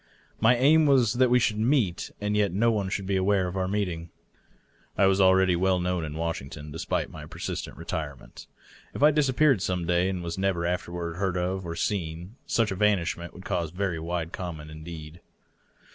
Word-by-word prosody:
My 115 +3 +5
aim 150 +5 +5
was 125 -6 +4
that 130 0 +3
we 125 - +5
should 115 -3 +1
meet 110 -7 +1
and 105 0 -1
yet 105 -3 +2
that 90 - -4
no 115 +2 +4
one 100 -4 -1
should 100 0 -3
be 95 0 0
aware 95 0 +2
of 90 - -5
our 95 -1 0
meeting. 90 -5 -2 0.9
I 100 - +5
was 95 0 +3
already 95 -1 +5
well 95 +1 +2
known 90 -1 -1
in 75 -1 -5
Washington, 75 -2 -4
despite 80 - -2
my - - -9
persistent - - -5
retirement. 75 -4 -6 0.5
If - - -1
I 150 - +8
disappeared, 140 -5 +3
some 90 -2 -1
day, 90 +2 +2
and 90 -2 -3
was 85 +2 -4
never 95 -3 0
afterward 85 -1 -3
heard 95 -1 -1
of 90 +1 -2
or 85 - -4
seen, 85 +3 -3
such 115 -3 +1
evanishment 95 -4 0
would 95 - -11
cause 85 -4 -1
very 90 -1 -2
wide 85 0 -3
comment 80 -4 -6
indeed. 80 +1 -9
95 Hz, 190 wpm, -27 LUFS, 85-105 Hz, 0.9 s, I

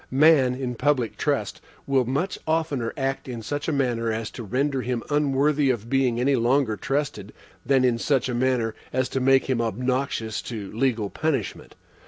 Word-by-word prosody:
Man, 135 -2 +5
in 130 -1 -3
public 130 -2 0
trust, - - -1 0.2
will 135 -2 +2
much 140 +10 -2
oftener 155 -7 0
act 135 -1 -2
in 120 -3 -6
such 145 +6 -3
a - - +1
manner 120 -5 0
as 110 0 -3
to - - -8
render 135 +5 0
him 125 -2 -2
unworthy 145 0 +2
of 120 -1 -2
being 130 -3 +2
any 135 +3 +3
longer 120 -1 +2
trusted, 125 -3 -3 0.3
than 135 -2 +3
in 120 -2 +2
such 135 -1 +1
a 125 - -2
manner 120 -2 +1 0.2
as 130 0 0
to 135 - -1
make 135 +1 +3
him 130 -3 +1
obnoxious 120 0 -1
to 105 -5 -6
legal 115 -3 0
punishment. 140 - -3
130 Hz, 175 wpm, -24 LUFS, 115-140 Hz, 0.3 s, Man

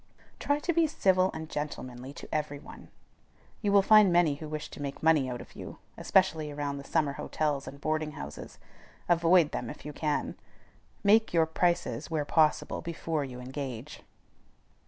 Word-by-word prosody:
Try 285 - +1
to 345 +4 -1
be 330 0 +3
civil 190 -9 +3
and 160 0 -6
gentlemanly 130 -4 -5
to - - -10
every 150 -2 -1
one. - - -12 0.7
You 205 - +1
will 200 -1 +6
find 215 -2 +7
many 170 -3 +4
who 150 +2 -8
wish 155 0 -4
to - - -9
make 140 +1 -5
money 155 -5 +4
out 125 -1 -5
of - - -14
you, - - -8 0.2
especially 165 -5 +2
around 145 -1 -3
the - - -8
summer 150 -1 0
hotels 145 -1 -2
and 140 - -9
boarding 155 0 -1
houses. 70 - -8 0.5
Avoid 170 -1 +4
them - - -4
if - - -10
you 150 - -6
can. 150 0 -2 0.7
Make 215 +1 +4
your 165 -1 +5
prices, 160 -7 0
where 155 -3 -1
possible, 155 0 +2
before 165 -2 -3
you 125 -2 -7
engage. 130 0 -6
155 Hz, 170 wpm, -29 LUFS, 140-175 Hz, 0.7 s, find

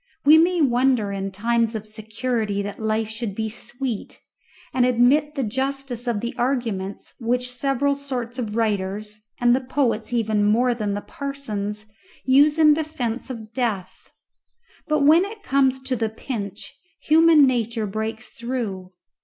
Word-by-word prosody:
We 310 +2 +8
may 345 +1 +3
wonder 250 -5 +2
in 195 0 -3
times 230 +3 0
of 215 -1 -4
security 215 -1 -2
that 205 0 -6
life 220 0 0
should 220 -2 -5
be 220 0 -2
sweet, 240 0 -5 0.5
and 255 - +3
admit 255 +5 +3
the 275 - -1
justice 265 +1 -3
of 225 -4 0
the 235 - -3
arguments 230 -7 -2
which 250 +1 0
several 275 +2 0
sorts 255 -3 -5
of 215 -3 -3
writers, 210 -1 -1 0.2
and 240 0 +4
the 265 - -1
poets 250 -4 -1
even 220 -3 +1
more 235 +4 +3
than 210 -3 -2
the 205 - -3
parsons, 215 -8 -4 0.4
use 285 +4 +5
in 305 -2 +6
defence 270 -7 -3
of 225 -3 -8
death. 220 -7 -3 0.8
But 305 -1 +1
when 315 +5 +6
it 415 +1 -8
comes 265 -3 +2
to 260 0 -1
the 225 -2 -1
pinch 215 -3 -6 0.3
human 315 -1 +6
nature 235 -3 0
breaks 220 +3 -4
through. 230 -7 -4
240 Hz, 150 wpm, -23 LUFS, 215-270 Hz, 0.8 s, We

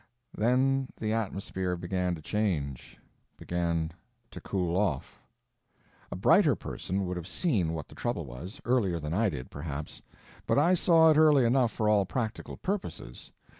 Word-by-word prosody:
Then 130 +4 +2
the 110 -1 -1
atmosphere 95 -4 -2
began 90 0 -1
to 80 - -12
change; 80 - -2 0.4
began 85 -2 -1 0.4
to - - -9
cool 90 -3 -1
off. 95 -9 -1 0.9
A - - -3
brighter - - +4
person 95 +1 -4
would 90 0 -3
have 85 -1 -6
seen 95 - 0
what 80 -3 -5
the - - -15
trouble 120 -9 -3
was, 70 - -9
earlier 105 -9 +1
than 75 +1 -4
I 110 +3 +2
did, 65 -7 -7
perhaps, 75 0 -6 0.5
but - - +2
I 165 +6 +4
saw 165 -2 +5
it 150 - +3
early 150 -5 +6
enough 120 -1 +3
for 110 - -1
all 105 -2 +3
practical 115 -4 -4
purposes. 185 - -5
95 Hz, 155 wpm, -29 LUFS, 85-120 Hz, 0.9 s, early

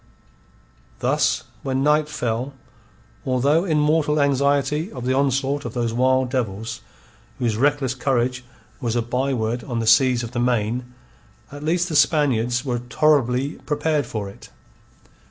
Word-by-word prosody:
Thus, - - +1 0.2
when 135 0 -1
night 150 +1 +3
fell, 125 0 -3 0.7
although 140 +6 +2
in 160 -5 +1
mortal 150 0 +2
anxiety 140 +4 +1
of 125 -3 -7
the 130 - +1
onslaught 135 +1 0
of - - -6
those 120 -2 -1
wild 130 +1 +2
devils 115 -4 -3 0.6
whose 115 -3 0
reckless 135 +1 +1
courage 130 -1 -1 0.4
was 120 -4 -2
a 120 - +1
byword 120 -1 -1
on 120 -3 -4
the 115 - -1
seas 125 +1 +4
of 115 - -6
the 120 - -3
Main, 120 0 0 0.6
at 145 +1 -9
least 175 +3 +1
the 160 - -4
Spaniards 125 -5 +2
were 120 -2 -1
tolerably 135 +1 +1
prepared 150 0 0
for 105 -3 -4
it. 100 - -12
130 Hz, 140 wpm, -22 LUFS, 120-145 Hz, 0.7 s, seas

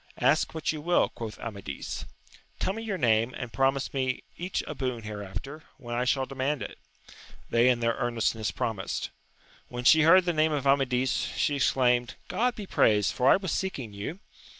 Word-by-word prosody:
Ask - - +2
what 160 - 0
you 155 -1 -5
will, 175 +3 +2
quoth 110 -2 -7
Amadis. 100 -11 -6 0.3
— - - -26
Tell 190 - 0
me 225 - -6
your 215 -4 -3
name, 115 -2 +2
and 125 -2 -6
promise 135 0 +1
me 130 -2 -1
each 180 +2 -3
a - - -5
boon 125 -4 -3
hereafter, 105 +8 -7 0.2
when 120 -3 -7
I 125 +1 0
shall 135 +1 +1
demand 135 +2 -2
it. - - -8 0.7
They 120 +2 +5
in 120 -2 +2
their 115 0 +2
earnestness 115 -2 -1
promised. 105 -5 -3 0.6
When 120 0 -6
she 160 +6 +7
heard 175 +4 +6
the 175 - +1
name 155 0 +2
of 140 -2 -2
Amadis, 130 -2 +2 0.3
she 145 - +1
exclaimed, 125 -3 +2
God 245 0 +1
be 210 - -6
praised, 105 - +3
for 125 - +3
I - - +8
was 190 -4 -2
seeking 135 - -3
you 105 - -5
130 Hz, 185 wpm, -28 LUFS, 115-155 Hz, 0.7 s, I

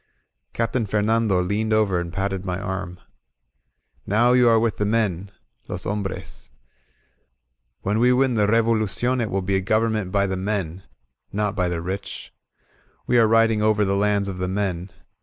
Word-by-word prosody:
Captain 115 0 -1
Fernando 105 -1 +1
leaned 105 +4 -1
over 105 -4 +2
and 85 -1 -5
patted 95 0 -2
my 90 -1 -3
arm. 95 -3 -5 1.1
Now 115 +4 +3
you 125 -1 +5
are 115 - +5
with 115 -1 0
the - - 0
men 100 -4 0 0.4
{los - - -5
hombres.) 95 -11 -5 1.3
When 105 +3 0
we 125 +2 +4
win 130 0 +2
the 105 -3 +2
Revolucion 115 +2 +1
it 110 - -2
will 95 0 -1
be 95 +1 +1
a - - -1
government 110 -1 0
by 100 0 +2
the 95 -1 -2
men, 95 -3 -3 0.5
—not 105 0 -1
by 90 -3 0
the 85 -1 -3
rich. 95 +3 -6 0.7
We 120 0 +3
are 115 - +5
riding 115 -1 +3
over 105 -1 +2
the 100 0 0
lands 100 0 +1
of 95 -2 -5
the 90 - -1
men. 95 -2 -2
105 Hz, 165 wpm, -23 LUFS, 95-110 Hz, 1.3 s, you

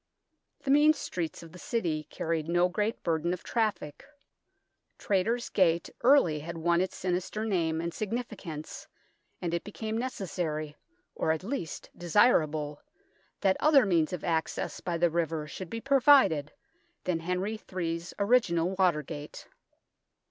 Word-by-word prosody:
The 270 - 0
mean 300 +2 +6
streets 170 - -4
of 165 - -12
the 180 - -12
City 175 - -2
carried 160 +1 -3
no 175 +1 +3
great 210 +5 -2
burden 165 +1 0
of 180 - -6
traffic. 215 -10 -2 0.9
Traitors' 225 +5 0
Gate 170 -3 +2
early 240 - +5
had 165 +3 -6
won 170 +1 +2
its 185 - -2
sinister 185 +4 -2
name 165 -6 0
and 170 0 -3
significance, 210 -8 -5 0.6
and 170 -1 -1
it 170 - -1
became 220 +1 -5
necessary 170 -11 -3 0.4
or 160 - 0
at 160 +2 -2
least 205 - -5
desirable 155 -6 +2 0.6
that 190 -2 +3
other 295 -5 +5
means 170 -5 +2
of 180 - -5
access 160 -1 -1
by 175 -2 -2
the 170 0 +2
river 160 -2 -1
should 170 +3 -8
be 230 - -4
provided 265 - +4 0.5
than 180 -3 0
Henry 180 +6 -2 0.2
Ill's 170 0 -3
original 200 -6 +2
Watergate. 150 -4 -1
175 Hz, 135 wpm, -29 LUFS, 160-215 Hz, 0.9 s, mean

